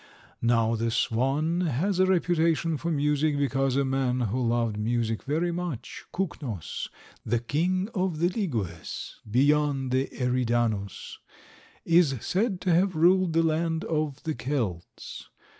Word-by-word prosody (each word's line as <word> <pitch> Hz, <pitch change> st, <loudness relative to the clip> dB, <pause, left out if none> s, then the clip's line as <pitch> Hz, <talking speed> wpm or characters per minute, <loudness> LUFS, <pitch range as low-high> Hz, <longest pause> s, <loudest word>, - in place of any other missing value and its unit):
Now 115 Hz, -1 st, +2 dB
the 115 Hz, +1 st, -1 dB
swan 135 Hz, +10 st, +1 dB
has 175 Hz, +8 st, 0 dB
a 185 Hz, -, +5 dB
reputation 165 Hz, -3 st, +2 dB
for 170 Hz, +3 st, -3 dB
music, 150 Hz, -1 st, +1 dB
because 135 Hz, -1 st, +1 dB
a 140 Hz, 0 st, +2 dB
man 130 Hz, -1 st, 0 dB
who 120 Hz, +2 st, 0 dB
loved 115 Hz, -2 st, +1 dB
music 115 Hz, +1 st, -1 dB
very 160 Hz, +5 st, 0 dB
much, 170 Hz, -8 st, -5 dB
Kuknos, 140 Hz, -, -4 dB, 0.3 s
the 120 Hz, +2 st, +1 dB
king 175 Hz, -, 0 dB
of 185 Hz, -4 st, -1 dB
the 170 Hz, +3 st, +2 dB
Ligyes 150 Hz, -, -4 dB
beyond 140 Hz, +1 st, +2 dB
the 130 Hz, +1 st, +1 dB
Eridanus, 120 Hz, -5 st, -1 dB, 0.7 s
is 165 Hz, -5 st, +4 dB
said 195 Hz, -, 0 dB
to 180 Hz, -, +2 dB
have 180 Hz, +1 st, +2 dB
ruled 180 Hz, +2 st, +4 dB
the 165 Hz, 0 st, +3 dB
land 160 Hz, +1 st, 0 dB
of 150 Hz, -3 st, -2 dB
the 160 Hz, -, -1 dB
Kelts. 115 Hz, -, -4 dB
145 Hz, 135 wpm, -27 LUFS, 120-170 Hz, 0.7 s, a